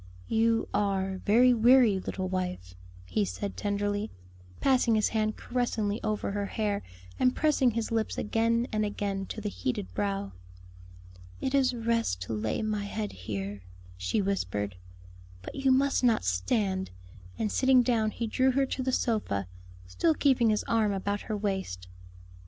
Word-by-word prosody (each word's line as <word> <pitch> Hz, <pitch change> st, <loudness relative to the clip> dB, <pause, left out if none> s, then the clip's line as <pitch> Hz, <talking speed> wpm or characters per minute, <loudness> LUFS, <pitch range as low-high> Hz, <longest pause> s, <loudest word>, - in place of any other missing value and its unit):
"You 225 Hz, 0 st, +2 dB
are 195 Hz, -2 st, 0 dB
very 245 Hz, +4 st, +6 dB
weary, 235 Hz, -3 st, +5 dB
little 185 Hz, 0 st, -4 dB
wife," 180 Hz, -, -3 dB, 0.3 s
he 210 Hz, -, 0 dB
said 200 Hz, +1 st, -4 dB
tenderly, 205 Hz, +1 st, -1 dB, 0.5 s
passing 255 Hz, -4 st, +3 dB
his 215 Hz, -, +2 dB
hand 215 Hz, -1 st, 0 dB
caressingly 230 Hz, -3 st, -1 dB
over 215 Hz, -2 st, -1 dB
her 200 Hz, 0 st, -2 dB
hair 205 Hz, -2 st, -1 dB, 0.4 s
and 255 Hz, 0 st, +3 dB
pressing 295 Hz, -4 st, +3 dB
his 230 Hz, -1 st, -2 dB
lips 225 Hz, -1 st, -1 dB
again 230 Hz, +2 st, +1 dB
and 215 Hz, -1 st, 0 dB
again 200 Hz, -2 st, -2 dB
to -, -, -6 dB
the 210 Hz, -1 st, -3 dB
heated 100 Hz, -, -3 dB
brow. 100 Hz, 0 st, -2 dB, 1.1 s
"It 265 Hz, -, -2 dB
is 265 Hz, -3 st, +3 dB
rest 230 Hz, -, 0 dB
to 105 Hz, -, -5 dB
lay 110 Hz, -, -1 dB
my 210 Hz, -1 st, -1 dB
head 210 Hz, +1 st, -3 dB
here," 100 Hz, +1 st, -5 dB, 0.3 s
she 90 Hz, -, -1 dB
whispered. 105 Hz, -, -2 dB, 0.7 s
"But -, -, -7 dB
you 270 Hz, -1 st, +2 dB
must 275 Hz, +1 st, +3 dB
not 235 Hz, -, +3 dB
stand;" 190 Hz, -, 0 dB, 0.5 s
and 215 Hz, -, -1 dB
sitting 260 Hz, -1 st, +4 dB
down 230 Hz, -3 st, +2 dB
he 230 Hz, -, -4 dB
drew 260 Hz, +4 st, +2 dB
her 275 Hz, +1 st, +3 dB
to 265 Hz, -, -3 dB
the 260 Hz, 0 st, 0 dB
sofa, 210 Hz, -, 0 dB, 0.4 s
still 310 Hz, -, +1 dB
keeping 255 Hz, -6 st, +3 dB
his 210 Hz, -1 st, +1 dB
arm 220 Hz, -3 st, +1 dB
about 200 Hz, +1 st, -2 dB
her 215 Hz, -, -1 dB
waist. 190 Hz, -, -3 dB
210 Hz, 155 wpm, -29 LUFS, 190-235 Hz, 1.1 s, very